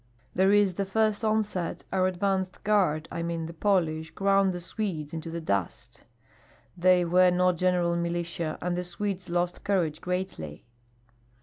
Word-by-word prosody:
There 190 +2 +3
in 205 0 +5
the 200 - -1
first 215 +2 +1
onset 215 -5 -1
our 185 -1 +3
advance 190 0 0
guard 185 -7 +2
I 170 - -3
mean 170 -1 -3
the 165 - -7
Polish 160 -4 0
ground 195 +3 +2
the 175 - -4
Swedes 175 -5 -4
into 165 0 -5
the 170 +1 -4
dust. 100 - -3 0.7
They 180 0 +4
were 180 +2 +5
not 180 0 +2
general 180 -1 +2
militia, 170 -2 -2
and 180 0 0
the 180 - -2
Swedes 185 +1 -4
lost 175 +1 -1
courage 170 -6 0
greatly." 180 - -4
180 Hz, 150 wpm, -27 LUFS, 170-195 Hz, 0.7 s, in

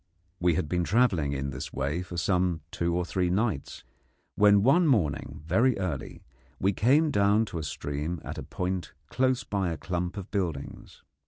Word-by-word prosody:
We 90 -2 +2
had 75 - -1
been 90 +3 0
travelling 90 - +2
in 70 0 -3
this 65 0 -6
way 70 +6 -2
for 90 -1 -7
some 90 0 +1
two 85 0 -1
or 90 0 0
three 90 0 0
nights, 95 - -1 0.5
when 100 -1 +5
one 165 +8 +5
morning 75 - 0
very 115 +9 +3
early 90 -8 -4 0.4
we 100 +2 +2
came 145 - +3
down 100 -1 +3
to 85 - -2
a - - -4
stream 75 +3 -4
at - - -6
a - - -4
point 90 0 -4 0.2
close 130 0 +1
by 95 -3 -1
a 80 - -3
clump 90 0 -3
of 100 0 -7
buildings. 85 -9 -4
90 Hz, 175 wpm, -28 LUFS, 80-105 Hz, 0.5 s, when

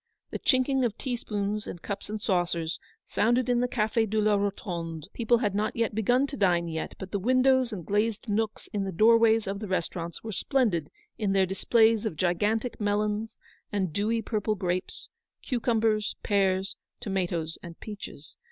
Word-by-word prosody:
The - - -4
chinking 260 0 +2
of 235 -3 -1
tea 255 -3 -2
spoons 210 -2 -3
and 175 - -6
cups 200 +3 -5
and 215 0 -3
saucers, 175 -5 0 0.3
sounded 240 +3 +2
in 245 -1 +2
the 250 - +2
Cafe 225 -1 +1
de 215 +1 0
la 210 0 +3
Rotonde: 170 -6 -3
people 235 0 +3
had 210 -4 0
not 210 +2 -1 0.2
begun 245 +5 +2
to 280 - -5
dine 175 -3 +2
yet, 160 -1 -4
but 190 - -8
the 200 - -1
windows 255 +3 +3
and 180 -6 -6
glazed 215 +2 0
nooks 215 +1 -1
in 205 -1 0
the 195 - -3
doorways 225 +3 +5
of 195 +1 -3
the 215 - -5
restaurants 170 -2 -3
were 220 - -5
splendid 210 - +1 0.3
with 205 -3 +1
their 190 -1 +4
displays 220 +3 +3
of 175 - -4
gigantic 210 +8 0
melons, 210 +2 -1 0.3
and 190 -6 -1
dewy 225 +4 0
purple 215 -1 -1
grapes, 180 -1 -3 0.3
cucumbers, 225 -3 +1
pears, 190 -1 +1 0.2
tomatoes, 175 -5 -2
and 170 -2 -10
peaches. 200 -8 -9
210 Hz, 170 wpm, -28 LUFS, 190-225 Hz, 0.3 s, doorways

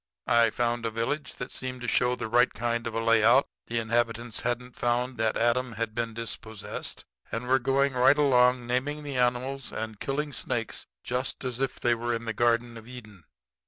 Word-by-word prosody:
"I 115 -1 +4
found 120 +1 -1
a 115 - 0
village 115 +7 -3
that 125 - -6
seemed 130 -1 -5
to 120 - -4
show 125 +1 +3
the 120 - -4
right 120 +3 +4
kind 115 +2 -2
of 115 - -5
a - - +1
layout. 115 +3 +5 0.2
The 115 - -2
inhabitants 115 0 0
hadn't 125 +1 -2
found 120 +1 0
that 110 -1 +1
Adam 120 +1 +1
had 110 0 -3
been 115 -1 -3
dispossessed, 110 -2 -6 0.3
and 115 +2 -3
were 130 +1 +4
going 135 +2 +2
right 130 +3 +5
along 125 -3 +4
naming 140 +5 -1
the 140 -3 -4
animals 125 +2 0
and 110 -2 -5
killing 145 +1 -2
snakes - - -3 0.2
just 125 +3 -3
as 125 -1 -3
if 135 -1 -2
they 120 - +3
were 120 0 -1
in 115 0 -5
the 115 - -2
Garden 120 +1 +1
of 115 0 -12
Eden. 110 -7 -11
120 Hz, 195 wpm, -28 LUFS, 115-125 Hz, 0.3 s, layout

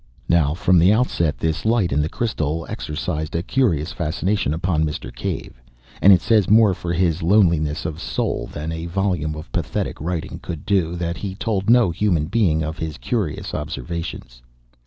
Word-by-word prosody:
Now, 80 -3 +3
from 90 0 +3
the 90 +4 +5
outset 85 - +1
this 80 +4 -1
light 110 -5 +2
in 70 +2 +2
the 75 - -1
crystal 80 -9 -2
exercised 75 +1 -4
a 85 - 0
curious 90 - +1
fascination 90 0 -1
upon 80 0 0
Mr. 75 -1 -4
Cave. - - -5 0.4
And 100 - +8
it 90 -3 +6
says 105 -5 +3
more 105 -2 +6
for 85 -1 -4
his 85 0 +1
loneliness 85 -5 +2
of 80 -1 -4
soul - - -2
than 75 +2 -4
a 80 +1 -4
volume 85 -4 -1
of 75 - -9
pathetic - - -3
writing 85 0 -3
could 80 -2 -6
do, 95 -5 +1
that 85 -1 -3
he 95 0 -5
told 100 -1 -1
no 120 -6 +5
human 85 -3 +1
being 85 -5 +1
of 80 +1 -5
his 80 -2 -4
curious 75 - -3
observations. 75 -4 -5
85 Hz, 175 wpm, -21 LUFS, 80-95 Hz, 0.4 s, And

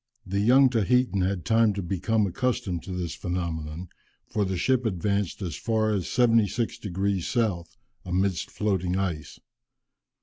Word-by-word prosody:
The 100 +2 -2
young 130 +6 +6
Tahitan 120 -2 +2
had 90 -3 -1
time 110 +2 +4
to 100 - -3
become 100 +5 0
accustomed 100 -4 -1
to 95 - -6
this 90 -2 -3
phenomenon, 85 -2 -4 0.4
for 105 -2 -1
the 95 -1 -2
ship 130 +7 +2
advanced 100 -1 -1
as 85 -5 -4
far 110 +7 0
as 100 -5 -1
76 115 -1 +2
degrees 95 -1 -1
south, 100 -8 -1 0.3
amidst 95 0 -1
floating 95 -3 -1
ice. 85 -7 -3
100 Hz, 140 wpm, -26 LUFS, 90-110 Hz, 0.4 s, young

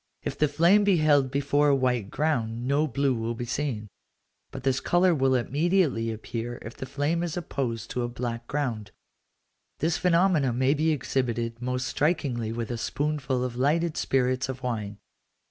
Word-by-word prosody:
If - - -3
the 150 - +2
flame 170 +8 +4
be 200 -3 +4
held 145 -4 +4
before 145 +2 +2
a 140 - +5
white 125 -6 0
ground, 120 -6 -1
no 145 +3 +2
blue 135 0 +1
will 115 0 -2
be 120 - -4
seen, 120 -4 -3 0.6
but 135 -2 -8
this 135 -1 +1
colour 175 0 +3
will 135 -3 +2
immediately 145 -2 +1
appear 115 +2 -5
if 115 - -8
the 130 - -7
flame 145 +5 -1
is 175 -1 -3
opposed 120 -9 -3
to 125 - -2
a 120 - -1
black 120 -1 -4
ground. 120 -8 -2 0.9
This 160 +2 0
phenomenon 170 -8 +3
may 130 +2 +3
be 155 +2 +1
exhibited 120 -5 -1
most 125 0 -2
strikingly 135 -8 0
with 115 +1 -4
a 120 - -3
spoonful 140 -2 -1
of 125 -2 -3
lighted 155 +5 +1
spirits 130 0 0
of 130 0 -6
wine. 105 -5 -3
130 Hz, 170 wpm, -27 LUFS, 120-150 Hz, 0.9 s, a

